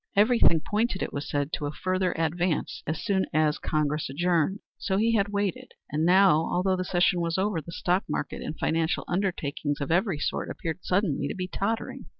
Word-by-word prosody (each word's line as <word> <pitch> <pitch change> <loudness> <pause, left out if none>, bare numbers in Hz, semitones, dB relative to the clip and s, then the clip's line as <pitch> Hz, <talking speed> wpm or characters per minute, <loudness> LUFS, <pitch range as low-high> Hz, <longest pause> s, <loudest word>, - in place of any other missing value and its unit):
Everything 210 -5 +5
pointed, 210 0 -1
it - - -5
was 140 0 -4
said, 145 +1 -1
to 145 - -1
a - - -3
further 185 +2 0
advance 165 +1 -1
as 160 +2 -2
soon 190 -2 +1
as 155 -1 +2
Congress 150 -2 -1
adjourned. 175 +5 +1 0.2
So 190 -2 0
he 225 +3 +2
had 205 -2 +2
waited, 200 -3 -2 0.2
and 155 +2 0
now, 185 -3 +6
although 185 +1 +2
the 185 - -2
session 175 -1 +2
was 170 +1 -1
over, 190 -3 0
the 170 - -10
stock 180 +3 0
market - - -3
and 155 - -5
financial 160 0 0
undertakings 150 -6 -1
of 140 +2 -3
every 180 0 +2
sort - - -2
appeared 165 +1 -4
suddenly 180 -7 +1
to - - -4
be 185 -1 -3
tottering. 200 +5 -3
175 Hz, 190 wpm, -27 LUFS, 155-195 Hz, 0.2 s, now